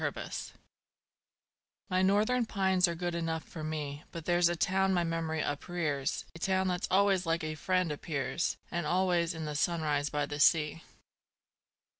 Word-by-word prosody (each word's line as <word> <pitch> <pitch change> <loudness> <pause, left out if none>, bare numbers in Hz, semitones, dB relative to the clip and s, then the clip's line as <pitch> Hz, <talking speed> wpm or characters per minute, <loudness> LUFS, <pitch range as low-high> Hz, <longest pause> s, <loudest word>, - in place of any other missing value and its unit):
Boston - - -4 1.3
My 185 -1 +1
northern 215 +5 +3
pines 190 -3 +3
are 170 - -2
good 175 +1 -2
enough 165 -1 -2
for 160 - -8
me, 150 -2 -4
But 165 -2 -7
there's 175 -1 +4
a 175 - 0
town 190 +2 +2
my 175 - +2
memory 165 -1 -1
uprears 145 -1 -2
A 165 - -11
town 190 +1 +1
that 180 +1 -1
always 190 -1 +3
like 165 0 +1
a 155 0 -2
friend 185 +1 0
appears, 150 +2 -2
And 170 -3 -2
always 175 -1 +1
in 160 -1 -4
the 150 - -3
sunrise 150 -2 0
by 145 -1 -1
the 145 0 -5
sea. 155 +1 +4
170 Hz, 160 wpm, -31 LUFS, 155-185 Hz, 1.3 s, there's